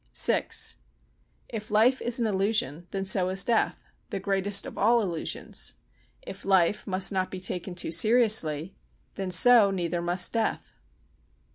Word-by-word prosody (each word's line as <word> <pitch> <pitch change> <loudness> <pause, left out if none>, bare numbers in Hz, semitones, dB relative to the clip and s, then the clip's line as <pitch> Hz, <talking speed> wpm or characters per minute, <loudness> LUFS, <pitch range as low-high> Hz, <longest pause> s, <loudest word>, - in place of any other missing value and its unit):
vi - - +3 1.0
If 215 -1 -8
life 225 +5 +2
is 240 +1 0
an 235 - 0
illusion, 190 -6 -1
then 195 -1 -4
so 185 -1 +1
is 190 +1 +4
death—the 225 -3 -3
greatest 195 +1 0
of - - -9
all 230 +2 +2
illusions. 170 -5 -4 0.5
If 195 - -10
life 190 +1 +1
must 190 0 +1
not 185 -1 -2
be 185 - -7
taken 180 0 -5
too 175 - -3
seriously—then 195 -3 0
so 210 +4 +5
neither 175 -2 -3
must 175 +1 0
death. 225 -1 -3
195 Hz, 135 wpm, -26 LUFS, 180-215 Hz, 1.0 s, so